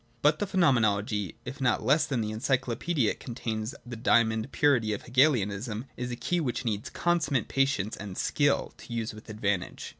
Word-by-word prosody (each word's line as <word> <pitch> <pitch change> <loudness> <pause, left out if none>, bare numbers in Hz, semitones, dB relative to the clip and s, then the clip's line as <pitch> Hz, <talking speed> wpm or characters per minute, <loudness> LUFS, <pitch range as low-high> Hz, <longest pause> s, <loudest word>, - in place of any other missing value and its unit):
But 150 +1 +4
the 205 - -1
Phenomenology, 110 - +2
if 130 +2 -7
not 125 -4 +2
less 150 +3 +4
than 130 -5 0
the 110 0 -2
Encyclopaedia 125 +3 0
it - - -8
contains 115 +1 -4
the 120 -1 -6
diamond 110 +1 +2
purity 120 -7 +3
of 105 - -5
Hegelianism, 120 -4 +1
is 125 0 -4
a 120 - -3
key 175 +9 -1
which 130 -4 -2
needs 105 -2 -2
consummate 155 -7 0
patience 135 -6 0
and 100 -2 -7
skill 145 -1 +1
to - - -13
use 115 -1 -2
with 110 +1 -13
advantage. 105 -4 -2
120 Hz, 175 wpm, -28 LUFS, 110-135 Hz, -, But